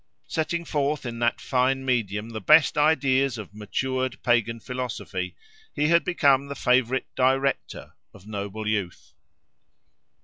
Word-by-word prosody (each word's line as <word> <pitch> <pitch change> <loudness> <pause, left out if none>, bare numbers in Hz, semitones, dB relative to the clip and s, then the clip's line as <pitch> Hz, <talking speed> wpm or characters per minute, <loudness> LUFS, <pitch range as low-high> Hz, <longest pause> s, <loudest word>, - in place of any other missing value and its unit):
Setting 170 +2 -2
forth 145 -2 -1
in 115 -1 -5
that 120 0 +1
fine 130 +1 0
medium 110 -3 -1
the 110 -1 -5
best 155 +8 +5
ideas 140 -4 +2
of 105 -3 -9
matured 130 +5 -2
pagan 115 -1 +1
philosophy, 115 -7 -5 0.4
he 150 +1 +1
had 170 -1 +4
become 140 -5 +2
the 140 - -6
favourite 125 0 +1
"director" 135 +1 0 0.2
of 100 -1 -17
noble 105 0 -5
youth. 100 -5 -3
130 Hz, 130 wpm, -25 LUFS, 110-140 Hz, 0.4 s, best